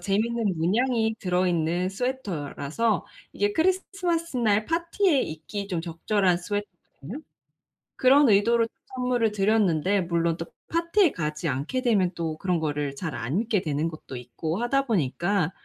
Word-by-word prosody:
재미있는 210 -2 0
문양이 220 +6 +1
들어있는 180 -1 +1
스웨터라서 200 - -2 0.3
이게 410 0 0
크리스 375 +1 +2
스마스 340 -5 -1
날 215 -3 +2
파티에 335 - +1
입기 180 +6 -5
좀 175 -4 -1
적절한 180 +3 +1
스웨터거든요. 205 - -6 0.8
그런 275 +2 +6
의도로 230 +3 +4 0.3
선물을 250 -3 +1
드렸는데 195 -3 +2
물론 170 -1 0
또 165 - -5 0.2
파티에 335 +1 +3
가지 155 0 -3
않게 145 - -1
되면 200 -8 +3
또 165 -2 -2
그런 180 -1 0
거를 145 -2 -2
잘 160 +2 -4
안 135 - -1
입게 220 -3 +1
되는 155 0 -1
것도 155 -4 -9
있고 125 - -4
하다 275 +3 +1
보니까 175 - +1
200 Hz, 320 characters per minute, -26 LUFS, 165-240 Hz, 0.8 s, 그런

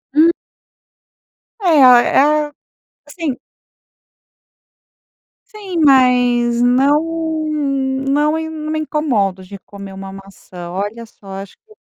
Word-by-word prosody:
Hum. 320 +3 +5 1.3
É, - - -6
é 250 -3 +6
a 300 +1 +2 0.6
assim. 295 -3 -5 2.1
Sim, 400 -4 -7
mas 245 -3 +3
não 270 +4 +3 1.1
não 295 +3 +1
e 320 0 -5
não 310 -1 -6
me 315 - -2
incomodo 235 -12 -1
de 195 +1 -11
comer 200 -1 -11
uma 195 0 -9
maçã. 190 -3 -11
Olha 205 +5 -5
só, 215 -2 -21
acho 195 - -12
que. 435 - -20
250 Hz, 105 wpm, -17 LUFS, 200-300 Hz, 2.1 s, é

